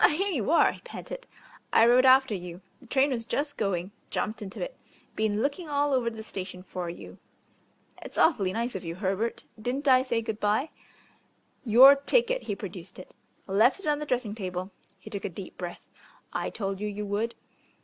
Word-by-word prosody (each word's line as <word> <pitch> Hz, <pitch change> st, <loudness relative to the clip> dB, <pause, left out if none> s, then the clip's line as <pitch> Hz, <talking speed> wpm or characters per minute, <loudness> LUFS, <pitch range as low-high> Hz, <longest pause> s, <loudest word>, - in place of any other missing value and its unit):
"Ah, -, -, +9 dB
here 385 Hz, +7 st, 0 dB
you 275 Hz, -, -1 dB
are," 335 Hz, -, +5 dB
he -, -, -12 dB
panted; -, -, -8 dB, 0.4 s
"I 225 Hz, -, +6 dB
rode 250 Hz, +2 st, +6 dB
after 260 Hz, -2 st, +6 dB
you 180 Hz, -1 st, -6 dB, 0.2 s
the 255 Hz, -, -17 dB
train 270 Hz, +3 st, +3 dB
was 235 Hz, -3 st, -2 dB
just 285 Hz, +5 st, -2 dB
going 185 Hz, -2 st, -1 dB, 0.2 s
jumped 215 Hz, +1 st, -2 dB
into 195 Hz, -2 st, -7 dB
it -, -, -4 dB, 0.4 s
been 215 Hz, 0 st, 0 dB
looking 300 Hz, +4 st, -2 dB
all 290 Hz, 0 st, +1 dB
over 250 Hz, -3 st, +2 dB
the 220 Hz, -1 st, -8 dB
station 185 Hz, -3 st, -7 dB
for 180 Hz, -2 st, -5 dB
you." 170 Hz, -, -10 dB, 0.8 s
"It's -, -, -10 dB
awfully 205 Hz, -, +3 dB
nice 235 Hz, +4 st, -2 dB
of 190 Hz, -, -5 dB
you, 165 Hz, -1 st, -5 dB
Herbert. 195 Hz, +4 st, -2 dB, 0.2 s
Didn't 265 Hz, +5 st, -2 dB
I 255 Hz, -1 st, +7 dB
say 235 Hz, -3 st, -1 dB
good 220 Hz, -1 st, -4 dB
bye?" 215 Hz, +9 st, +1 dB, 0.9 s
"Your 255 Hz, +4 st, +9 dB
ticket." 485 Hz, -, +1 dB
He 205 Hz, -, -3 dB
produced 185 Hz, -2 st, -9 dB
it. 185 Hz, -, -11 dB, 0.3 s
"Left 220 Hz, -, +3 dB
it 390 Hz, -, -9 dB
on 295 Hz, -1 st, +1 dB
the 300 Hz, -, -5 dB
dressing 245 Hz, -5 st, -1 dB
table." 185 Hz, -2 st, -5 dB, 0.3 s
He -, -, -12 dB
took 200 Hz, -, -5 dB
a -, -, -2 dB
deep 185 Hz, +1 st, -9 dB
breath. 175 Hz, -1 st, -7 dB, 0.5 s
"I -, -, -1 dB
told 195 Hz, -3 st, -4 dB
you 210 Hz, -, -2 dB
you 210 Hz, 0 st, -4 dB
would." 210 Hz, +3 st, -2 dB
225 Hz, 195 wpm, -28 LUFS, 195-270 Hz, 0.9 s, Ah